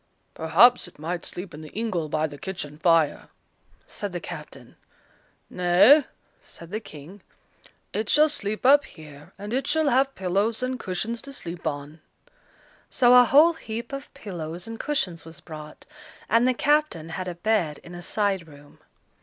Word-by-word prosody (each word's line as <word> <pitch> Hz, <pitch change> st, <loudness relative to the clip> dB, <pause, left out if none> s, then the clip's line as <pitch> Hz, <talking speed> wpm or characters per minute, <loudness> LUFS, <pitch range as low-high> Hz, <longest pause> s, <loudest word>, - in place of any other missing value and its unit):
"Perhaps 190 Hz, +10 st, +4 dB
it 180 Hz, -, -17 dB
might 170 Hz, +3 st, -4 dB
sleep 180 Hz, 0 st, -8 dB
in 150 Hz, -, -9 dB
the 155 Hz, -, -10 dB
ingle 195 Hz, -8 st, -2 dB
by 155 Hz, +1 st, 0 dB
the 145 Hz, -2 st, -8 dB
kitchen 150 Hz, -4 st, -6 dB
fire," 165 Hz, -3 st, +2 dB, 0.6 s
said -, -, -5 dB
the -, -, -4 dB
captain. -, -, -10 dB, 0.7 s
"Nay," 195 Hz, -, +5 dB, 0.4 s
said 170 Hz, +1 st, -11 dB
the 215 Hz, -, -2 dB
King, 175 Hz, 0 st, -12 dB, 0.7 s
"it 215 Hz, 0 st, -2 dB
shall 305 Hz, +1 st, +5 dB
sleep 215 Hz, -7 st, -4 dB
up 285 Hz, +2 st, +7 dB
here, 150 Hz, -3 st, -14 dB
and 205 Hz, +3 st, -6 dB
it 265 Hz, +2 st, -1 dB
shall 315 Hz, -1 st, +2 dB
have 270 Hz, +2 st, +2 dB
pillows 200 Hz, +6 st, -1 dB
and 255 Hz, 0 st, -2 dB
cushions 220 Hz, +5 st, -3 dB
to 275 Hz, -, -10 dB
sleep 170 Hz, -10 st, -7 dB
on." 145 Hz, +1 st, -5 dB, 0.9 s
So 245 Hz, -2 st, +4 dB
a 250 Hz, 0 st, +8 dB
whole 300 Hz, +7 st, +6 dB
heap 235 Hz, -5 st, -7 dB
of 275 Hz, 0 st, -7 dB
pillows 175 Hz, -3 st, -7 dB
and 225 Hz, 0 st, -7 dB
cushions 185 Hz, -, -2 dB
was 165 Hz, 0 st, -12 dB
brought, 155 Hz, -2 st, -11 dB, 0.4 s
and 230 Hz, +3 st, +3 dB
the 255 Hz, -, +2 dB
captain 290 Hz, -, +1 dB
had 180 Hz, +3 st, -5 dB
a 180 Hz, -, -4 dB
bed 175 Hz, -5 st, 0 dB
in 175 Hz, -, -11 dB
a 175 Hz, -, -8 dB
side 195 Hz, -3 st, -1 dB
room. 145 Hz, -1 st, -17 dB
190 Hz, 165 wpm, -25 LUFS, 160-245 Hz, 0.9 s, a